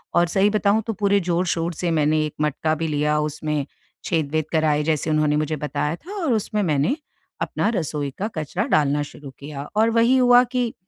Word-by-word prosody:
और 175 0 +4
सही 195 +4 +2
बताऊँ 215 +1 +2
तो 225 - -1
पूरे 200 -1 +2
जोर-शोर 175 -1 -1
से 170 +1 -2
मैंने 155 -1 +2
एक 150 - -6
मटका 150 +1 0
भी 160 +1 -2
लिया। 150 0 +1
उसमें 150 -1 -2 0.4
छेद-वेद 155 -2 0
कराए, 155 -2 +2
जैसे 155 0 0
उन्होंने 155 -1 +2
मुझे 155 0 -1
बताया 150 +1 -2
था 360 - -11
और 280 -7 +2
उसमें 215 -1 -1
मैंने, 155 - +1 0.5
अपना - - 0
रसोई 150 -5 -2
का 205 - -2
कचरा 155 -3 -2
डालना 145 0 +2
शुरू 145 0 -10
किया। 140 0 -7
और 220 +2 +4
वही 230 +3 +4
हुआ 245 -1 +6
कि, 245 -1 -2
160 Hz, 190 wpm, -22 LUFS, 150-205 Hz, 0.5 s, हुआ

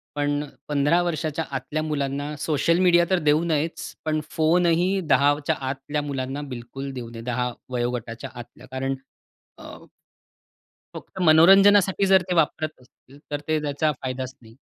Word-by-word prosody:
पण 145 0 0 0.2
15 150 +4 +2
वर्षाच्या 160 -2 -2
आतल्या 145 +3 -3
मुलांना 145 0 -3
सोशल 155 +2 +1
मीडिया 175 -2 +5
तर 185 - +2
देऊ 150 +1 +2
नयेच, 160 -1 -2
पण 155 0 0
फोन 165 +3 +2
ही 180 +3 +2
10च्या 145 +1 +3
आतल्या 140 +2 -3
मुलांना 135 -1 -4
बिलकुल 125 +3 -7
देऊ 120 -3 -6
नये. 115 -1 -9
10 125 +1 -2 0.2
वयोगटाच्या 120 -1 -3
आतल्या 120 0 -12
कारण 135 +1 -2 0.6
अ - - -12 1.1
फक्त 190 - -8
मनोरंजनासाठी 195 +4 +6
जर 190 -1 +7
ते 180 - +1
वापरत 155 -1 +1
असतील, 130 +2 -21
तर 145 - -1
ते 155 -1 +1
त्याचा 150 +1 0
फायदाच 130 0 -4
नाही. 115 -1 -17
145 Hz, 145 wpm, -24 LUFS, 130-165 Hz, 1.1 s, जर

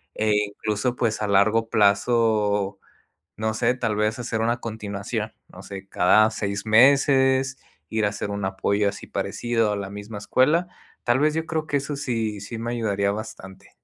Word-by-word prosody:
e 110 -1 +1
incluso 105 +4 -2
pues, 110 -3 0
a 105 - 0
largo 110 +3 +3
plazo, 105 -1 +2 0.6
no 110 +1 -1
sé, 120 +2 +1
tal 115 -4 -1
vez 110 +3 0
hacer 115 -2 -3
una 120 +2 +1
continuación, 105 0 -4 0.2
no 90 - -12
sé, 95 0 -9
cada 105 +4 +4
6 105 -1 -4
meses, 130 +2 +4 0.3
ir 110 -2 +1
a 105 - +1
hacer 105 0 -5
un 100 -1 -3
apoyo 100 +2 0
así 100 0 -6
parecido 115 -3 -1
a - - -1
la 100 -1 -5
misma 105 +1 -7
escuela, 150 - +2 0.4
tal 120 +1 +2
vez, 150 +1 +2
yo 160 - -1
creo 160 -1 -2
que 145 - +1
eso 140 +1 -4
sí 115 -7 -2
sí 105 +4 -7
me 120 +1 -3
ayudaría 100 -4 0
bastante. 100 -3 -9
110 Hz, 175 wpm, -24 LUFS, 100-120 Hz, 0.6 s, cada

